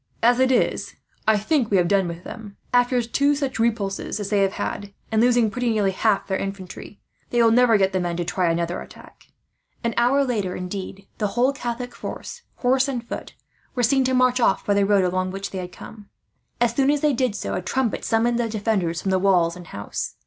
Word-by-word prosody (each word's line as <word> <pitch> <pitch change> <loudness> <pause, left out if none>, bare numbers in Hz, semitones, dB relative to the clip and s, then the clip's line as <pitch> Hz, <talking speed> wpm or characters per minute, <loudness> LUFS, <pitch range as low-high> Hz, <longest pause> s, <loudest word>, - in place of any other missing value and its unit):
"As 240 +2 +5
it 260 0 +4
is, 250 - 0 0.3
I 220 -1 +5
think 240 +3 +1
we 200 - +3
have 175 -1 +3
done 195 -1 +2
with 170 +1 -7
them. 210 -4 -9 0.2
After 245 0 +3
two 280 +5 +2
such 275 -4 -3
repulses 215 -4 -1
as 205 0 -4
they 205 - +3
have 195 -1 +2
had, 205 0 -4 0.2
and 220 0 +3
losing 240 -2 +3
pretty 245 +1 -1
nearly 210 -3 +2
half 205 +1 +1
their 190 -1 -2
infantry, 195 +1 -7 0.3
they 240 - 0
will 230 -1 +5
never 240 -1 +5
get 190 -1 +1
the 185 - +1
men 175 -1 -2
to 175 - -2
try 180 0 0
another 170 +1 -1
attack." - - -15 0.6
An 235 0 0
hour 255 +4 +4
later, 210 -8 -1
indeed, 190 +1 -6
the 210 - +1
whole 255 +3 +3
Catholic 245 -2 -5
force, 480 - -7
horse 260 +2 +2
and 245 -4 -4
foot, - - -7 0.4
were 245 - 0
seen 265 +3 +3
to 260 0 +1
march 255 0 +3
away 215 -5 +4
by 205 - +2
the 200 -1 +2
road 200 -2 +4
along 185 +1 0
which 195 +1 -5
they 190 - -4
had 180 -1 -6
come. 205 +2 -12 0.5
As 240 -1 +2
soon 270 +2 +2
as 290 -1 +2
they 300 -2 +3
did 250 -4 0
so, - - -4
a 180 - -2
trumpet 230 +6 -1
summoned 235 +1 +1
the 235 -1 0
defenders 200 -6 -1
from 195 - 0
the 190 - +2
walls 180 -3 +3
and 180 -1 -11
house. 100 - -5
215 Hz, 220 wpm, -23 LUFS, 190-245 Hz, 0.6 s, As